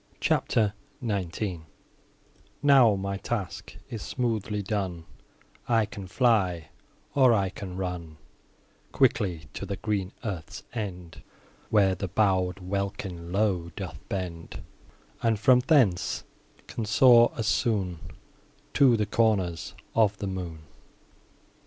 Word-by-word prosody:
CHAPTER 105 -3 +1 0.3
XIX 95 -3 -2 1.0
Now 135 -7 +6
my 100 0 -3
task 95 -5 -5
is 115 -3 -6
smoothly 110 -4 -2
done, 95 -5 -3 0.6
I 115 -2 +3
can 100 -2 -8
fly, 95 - +1 0.4
or 130 -4 +5
I 95 -2 +1
can 95 -1 -8
run 90 -4 -5 0.8
Quickly 100 -11 +2
to - - -6
the 100 - -3
green 100 -4 -2
earth's 95 -8 -5
end, 90 -7 -6 0.5
Where 100 -3 +4
the 95 +1 -4
bow'd 95 -1 +1
welkin 95 -2 -4
low 95 -4 +1
doth 90 -9 -6
bend, 90 -4 -5 0.6
And, 115 -2 +2
from 125 +3 +6
thence, 125 - +2 0.4
can 115 - -4
soar 120 +2 +6
as 115 - -2
soon 100 -5 0 0.7
To 130 -4 +5
the 105 - +1
corners 100 -6 0 0.2
of 105 -2 +3
the - - -4
moon. 90 -5 -5
100 Hz, 115 wpm, -27 LUFS, 90-110 Hz, 1.0 s, Now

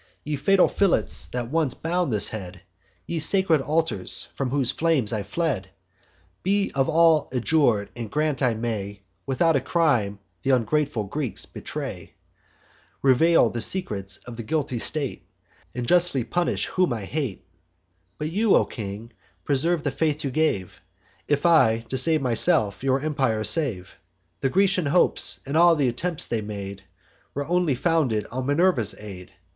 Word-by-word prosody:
Ye 150 0 -3
fatal 185 +7 +3
fillets, 95 - 0
that 120 +5 -5
once 155 -5 0
bound 175 -2 -1
this 105 -2 +3
head! 90 -4 -8 0.4
Ye 170 - -3
sacred 170 -2 +3
altars, 155 - -1
from 135 - -3
whose 135 -2 0
flames 155 -10 +1
I 110 - -1
fled! 105 - -3 0.7
Be 200 +1 0
all 160 +2 +3
of - - -18
you - - +1
adjur'd; 120 -7 +1
and 115 -3 -6
grant 150 -1 -1
I 125 -4 +2
may, 105 -3 -4 0.3
Without 155 +5 +2
a 135 - +1
crime, 130 - +1 0.3
th' - - -6
ungrateful 130 0 +1
Greeks 125 +4 -3
betray, - - -7 0.9
Reveal 140 0 +4
the 120 - -4
secrets 105 - -1
of 120 -2 -9
the - - -4
guilty 135 -1 -2
state, 145 +1 -2 0.5
And 125 -1 -4
justly 175 -7 +2
punish 175 +8 -1
whom 180 -8 0
I 115 - -4
justly 95 - -10
hate! 100 -9 -6 0.7
But 155 +1 -4
you, 210 +4 +3
O - - +3
king, 110 +1 -8 0.3
preserve 155 +4 0
the 145 - -1
faith 155 0 -1
you 135 - -2
gave, 125 - -1 0.5
If 145 +2 0
I, 120 -9 +4
to 130 - -2
save 155 +2 +4
myself, 120 - +3
your 135 0 +1
empire 135 -8 -1
save. 110 - +1 0.4
The 135 - 0
Grecian 190 -1 +2
hopes, 175 +5 +2
and 140 +2 -4
all 170 0 +5
th' - - -1
attempts 145 +6 +2
they 115 -2 -2
made, 100 -2 -7 0.5
Were 140 +1 -3
only 175 -3 +1
founded 135 -6 0
on 130 +1 -4
Minerva's 145 - +1
aid. 95 -4 -10
135 Hz, 160 wpm, -24 LUFS, 110-160 Hz, 0.9 s, all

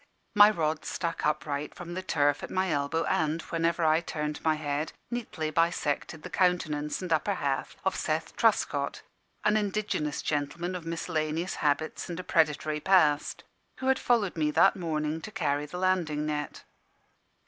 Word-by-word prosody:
My 205 0 +9
rod 160 -6 -1
stuck 165 -3 -2
upright 150 -1 -2
from 175 -1 -7
the 185 - -3
turf 145 -5 +1
at - - -6
my 185 -1 0
elbow, 145 +3 0
and, 160 0 +1
whenever 165 0 0
I 155 +1 +4
turned 150 -2 -4
my 160 -1 +3
head, 150 0 -2 0.2
neatly 200 -10 -3
bisected 160 -2 0
the - - -6
countenance 160 -4 0
and 175 -2 0
upper 195 +6 +1
half 140 -5 -2
of - - +1
Seth - - -2
Truscott, - - +1 0.4
an 210 0 +4
indigenous 205 -8 -1
gentleman 155 +5 -2
of 175 -2 -6
miscellaneous 165 0 -2
habits 150 +4 -1
and 170 0 -4
a - - -4
predatory 155 -2 +1
past, 155 -4 +3 0.3
who 260 - -6
had 265 - +3
followed 225 -6 +2
me 155 -2 +1
that 195 +6 +5
morning 160 -3 -2
to 215 - -7
carry 150 -8 -1
the 180 - -7
landing 175 -5 +1
net. 150 -1 -3
160 Hz, 160 wpm, -29 LUFS, 150-180 Hz, 0.4 s, My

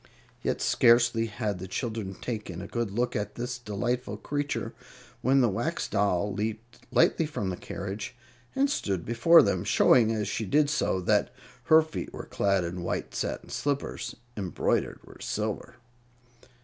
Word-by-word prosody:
Yet - - -1
scarcely 115 -1 +4
had 105 -3 -3
the 95 - -6
children 110 -2 -3
taken 105 -7 -5
a 95 - -6
good 120 +1 -2
look 120 +5 -1
at 105 0 -3
this 120 0 -4
delightful 120 +3 -2
creature, 145 0 -3 0.5
when 135 +2 +4
the 120 - +4
Wax 120 - -1
Doll 100 -1 +1
leaped 110 +3 -4
lightly 165 -1 +3
from 105 -11 -3
the - - -3
carriage 100 +6 -6 0.4
and 275 +1 +3
stood 95 - -2
before 160 +9 +6
them, 95 -4 0
showing, 115 -3 +5
as 110 -2 -1
she 110 - -2
did 145 +5 +3
so, 95 -10 +1
that 105 +5 +2 0.3
her 160 +3 +7
feet 155 - -6
were - - -7
clad 100 -2 +1
in 85 +1 -4
white 85 - -3
satin - - -3
slippers, 140 -1 -2 0.2
embroidered 95 -4 -1
with - - -15
silver. 110 +3 -3
110 Hz, 155 wpm, -28 LUFS, 100-125 Hz, 0.5 s, her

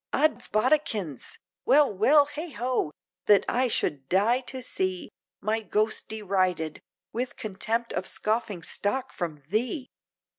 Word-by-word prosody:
Oddsbodikins, 240 - +1 0.3
well 285 -5 +5
well! 285 +9 +5
heigho! 280 - -2 0.4
that 205 -1 +6
I 255 +1 +2
should 140 - -1
die 215 +7 +3
to 260 0 -5
see, 185 -6 -1 0.3
My 220 +2 0
ghost 215 0 0
derided, 185 -7 -1 0.3
with 250 +4 -2
contempt 225 +3 -2
of 185 - -2
scoffing 215 -5 -1
stock 260 +10 -1
from 155 -5 -4
thee! 245 - -1
220 Hz, 115 wpm, -27 LUFS, 190-255 Hz, 0.4 s, that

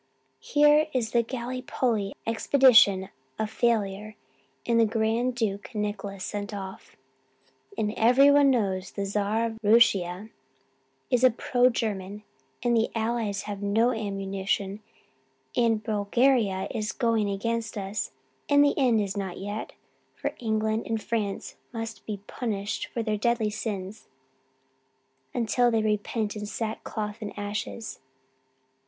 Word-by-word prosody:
'Here 295 +1 +4
is 235 -4 0
the 235 -1 +3
Gallipolly 245 -4 -2
expedition 225 -5 +5 0.3
a 220 - 0
failure 215 -2 -1 0.5
and 235 -1 +3
the 230 - +6
Grand 225 +3 0
Duke 220 0 -3
Nicholas 205 -2 -3
sent 205 0 -4
off, 190 -1 -8 0.8
and 210 0 0
everyone 275 +5 +6
knows 195 -7 0
the 200 - -4
Czar 210 +3 0
of 225 -1 -5
Rooshia 205 -2 +3 0.8
is 250 0 +3
a 255 - +8
pro 245 +1 +2
German 210 -3 -3 0.4
and 240 -1 +2
the 225 0 +2
Allies 225 -3 -1
have 205 -1 -6
no 220 +4 +2
ammunition 195 -2 -2 0.8
and 225 -3 +2
Bulgaria 210 -1 +2
is 215 -1 -2
going 225 -3 +1
against 225 +2 -2
us. 200 +1 -3 0.4
And 285 0 +6
the 285 - +3
end 245 -5 +4
is 200 -1 -2
not 195 -3 -4
yet, 205 +2 -5 0.4
for - - -3
England 220 -1 -1
and 225 -1 -1
France 210 -2 -3
must 225 -2 -6
be 210 -2 -3
punished 205 -4 -3
for 230 - -3
their 215 -1 -1
deadly 225 -1 +1
sins 205 -1 -5 1.2
until 240 0 +2
they 225 -2 +1
repent 210 0 -1
in 210 0 -5
sackcloth 215 -1 -4
and 205 -1 -6
ashes.' 205 +2 -5
220 Hz, 125 wpm, -27 LUFS, 205-235 Hz, 1.2 s, a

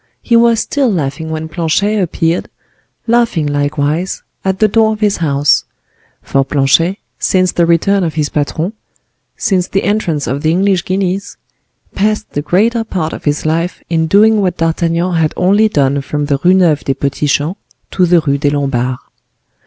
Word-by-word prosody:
He 235 - +2
was 230 -1 +4
still 270 -2 0
laughing 160 -2 -3
when 160 0 -4
Planchet 190 +6 0
appeared, 165 -1 -1 0.6
laughing 235 -8 +1
likewise, 145 +4 -1 0.2
at 190 0 0
the 215 - +3
door 220 +1 +2
of 215 - -7
his 210 -2 +1
house; 145 -3 +1 0.6
for 135 - +1
Planchet, 145 +7 +1 0.2
since 185 -1 +1
the 170 -1 +1
return 190 +4 +2
of 165 -2 -2
his 150 -2 0
patron, 155 +7 -2 0.6
since 185 -2 0
the 195 - -1
entrance 170 -9 -1
of 135 +4 -3
the 155 - +1
English 185 +1 +1
guineas, 190 +1 -2 0.6
passed 215 +2 -1
the 145 - -2
greater 220 +9 +1
part 180 -7 -3
of - - -8
his 145 0 -1
life 165 +3 -1
in 160 -1 +1
doing 210 +4 +4
what 185 -2 -1
D'Artagnan 165 +1 0
had 160 -2 0
only 205 +4 +3
done 140 -5 +1
from 145 +1 -3
the 140 -2 0
Rue 180 +1 +5
Neuve 170 -6 +2
des 135 - -1
Petits 140 +1 -1
Champs 155 +9 -1 0.3
to 185 -2 +2
the 170 -1 +4
Rue 140 -2 -1
des 145 0 +1
Lombards. 135 -3 -1
170 Hz, 170 wpm, -14 LUFS, 150-195 Hz, 0.6 s, Rue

